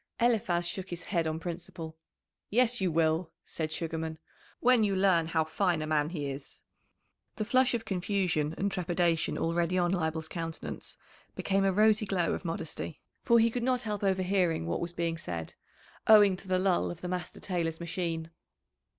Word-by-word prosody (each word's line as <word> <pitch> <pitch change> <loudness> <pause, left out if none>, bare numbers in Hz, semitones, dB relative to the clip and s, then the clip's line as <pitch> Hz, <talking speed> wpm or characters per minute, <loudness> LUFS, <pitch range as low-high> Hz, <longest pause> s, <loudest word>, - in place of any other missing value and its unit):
Eliphaz 210 -8 +2
shook 190 +2 -5
his 175 0 -5
head 170 -4 0
on 160 0 -2
principle. 170 -1 -6 0.5
"Yes, 245 0 +3
you 185 -2 +2
will," 160 +1 +1
said 155 -1 -4
Sugarman, 160 0 -3 0.4
"when 250 -2 +5
you 200 -2 +1
learn 185 -4 +3
how 160 -1 +1
fine 170 +2 0
a - - -2
man 155 -1 +1
he 155 -5 -4
is." 135 +1 -9 0.7
The 215 - -2
flush 255 +2 +3
of 225 -1 -3
confusion 180 -6 0
and 200 +1 0
trepidation 175 -2 0
already 170 +2 0
on 175 -1 +2
Leibel's 160 -3 -1
countenance 165 -1 -6 0.4
became 195 0 +1
a 195 - +4
rosy 215 +2 +4
glow 185 -3 +1
of - - -4
modesty, 165 -2 -4 0.2
for 235 - +4
he 230 0 +4
could 245 - -2
not 250 0 +1
help 210 -2 -3
overhearing 185 - +1
what 85 - -2
was 170 0 -2
being 170 -1 -2
said, 85 - -5 0.5
owing 205 -3 +8
to 190 - -12
the 185 0 +2
lull 185 -1 +2
of 175 0 -7
the 180 - -4
master 180 0 -4
tailor's 165 -4 -2
machine. 165 -1 -3
175 Hz, 175 wpm, -30 LUFS, 165-195 Hz, 0.7 s, owing